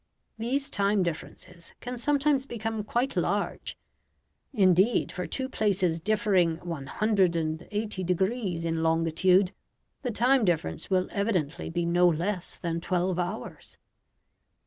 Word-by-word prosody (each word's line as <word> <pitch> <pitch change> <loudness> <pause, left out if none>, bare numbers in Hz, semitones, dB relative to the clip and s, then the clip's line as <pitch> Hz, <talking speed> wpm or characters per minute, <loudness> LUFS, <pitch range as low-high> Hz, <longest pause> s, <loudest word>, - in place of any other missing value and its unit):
These 270 +5 -1
time 200 -1 +2
differences 170 +1 -7
can 245 0 -6
sometimes 280 0 +1
become 225 -2 -3
quite 245 +5 -1
large. - - -1 0.7
Indeed, 195 -1 +3
for 180 0 -4
two 260 -1 -2
places 190 -8 0
differing 190 -4 +2
180 180 +4 -1
degrees 185 -1 -1
in 165 -1 -1
longitude, 165 +4 +3 0.5
the 255 - -2
time 245 +3 +3
difference 160 - -1
will 185 -1 +2
evidently 190 -8 -1
be 170 +1 -1
no 175 +1 +4
less 175 +3 -1
than 170 -1 -3
twelve 180 0 0
hours. 180 +5 -5
185 Hz, 115 wpm, -28 LUFS, 170-220 Hz, 0.7 s, no